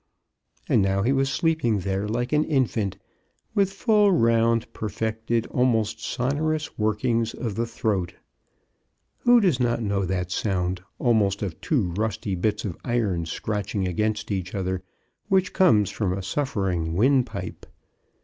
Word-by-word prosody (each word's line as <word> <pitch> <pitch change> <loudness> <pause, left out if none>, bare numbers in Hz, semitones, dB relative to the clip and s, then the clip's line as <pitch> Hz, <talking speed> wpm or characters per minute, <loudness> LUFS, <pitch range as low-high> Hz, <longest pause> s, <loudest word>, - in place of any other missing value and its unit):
And - - +3
now 95 0 +1
he 125 - +2
was 135 0 +2
sleep 160 +2 0
ing 110 -4 +2
there 95 +2 -2
like 120 +5 -2
an 150 0 +4
infant, 120 - 0 0.6
with 200 -3 +2
full, 210 0 +3
round, 115 -5 +2
per 110 - -4
fected, 110 +3 -1
almost 115 -3 +1
sonorous 150 +4 -1
workings 110 +2 0
of 115 -4 -3
the 115 +3 -2
throat. 100 -6 -2 1.0
Who 245 0 +6
does 180 - +2
not 120 -1 +1
know 100 -2 0
that 90 -1 -2
sound, 90 -2 -1 0.2
almost 105 -5 +2
of 90 -6 -5
two 115 - 0
rusty 105 +1 -2
bits 105 +4 -1
of 90 -5 -4
iron 105 -9 0
scratching 100 +1 -2
against 105 +4 -1
each 95 -2 -3
other, 95 -1 -2 0.5
which 190 -1 +2
comes 105 - +4
from 95 -4 -1
a 95 0 -4
suffering 95 - -1
windpipe 115 -4 0
110 Hz, 145 wpm, -25 LUFS, 95-125 Hz, 1.0 s, Who